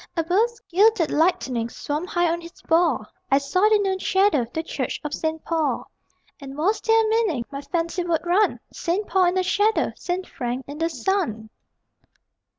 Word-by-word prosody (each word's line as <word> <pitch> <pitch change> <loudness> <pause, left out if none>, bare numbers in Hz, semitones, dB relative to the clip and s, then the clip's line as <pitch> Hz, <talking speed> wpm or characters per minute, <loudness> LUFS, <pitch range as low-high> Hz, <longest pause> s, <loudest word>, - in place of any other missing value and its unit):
Above, 360 +8 +2 0.2
gilded 390 -2 +4
Lightning 265 -8 +1
Swam 300 +8 -4
high 350 -2 +1
on 340 +1 -1
his 335 +1 -13
ball 325 -9 +2 0.2
I 275 - +5
saw 365 +9 +2
the 430 - +5
noon 385 -2 0
shadow 380 - +2
The 320 - -3
church - - -3
of 300 -1 -4
St. 320 0 -3
Paul. 320 -3 -1 0.5
And 275 -1 -9
was 385 +8 +1
there 450 0 +4
a - - 0
meaning? 430 - +1
(My 275 0 -5
fancy 335 +3 -2
would 340 -1 -1
run), 375 +5 +2
Saint 365 +5 -1
Paul 380 -1 +3
in 355 +1 +1
the 370 - +2
shadow, 410 +4 +2
Saint 365 +1 -3
Frank 245 +1 -4
in 290 +2 -8
the 330 0 +1
sun! 265 - -2
340 Hz, 175 wpm, -23 LUFS, 295-380 Hz, 0.5 s, I